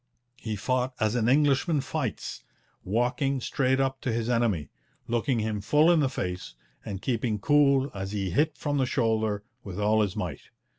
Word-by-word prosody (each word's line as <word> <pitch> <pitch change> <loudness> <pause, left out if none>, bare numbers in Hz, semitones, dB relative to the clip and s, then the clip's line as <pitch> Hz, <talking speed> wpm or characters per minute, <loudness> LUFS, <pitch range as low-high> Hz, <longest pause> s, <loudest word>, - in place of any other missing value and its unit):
He 110 -1 -3
fought 125 +4 -1
as 110 -2 +1
an 120 -1 +1
Englishman 145 +3 +3
fights: - - -4 0.4
walking 125 +6 0
straight 130 +2 +1
up 135 0 0
to 125 - -1
his 115 +1 -1
enemy, 115 -11 +1 0.4
looking 120 +2 0
him 110 -2 -1
full 150 - +4
in 170 - +4
the 140 -3 +2
face, 90 - -4 0.3
and 95 -1 -6
keeping 115 -3 0
cool 140 +3 +3
as 95 -1 -5
he 100 -3 -2
hit 150 - +1
from 145 -1 -1
the 130 - +2
shoulder 110 -5 0 0.2
with 100 -1 -6
all 110 +1 +3
his 100 -2 -1
might. 90 -9 -4
120 Hz, 170 wpm, -27 LUFS, 105-135 Hz, 0.4 s, full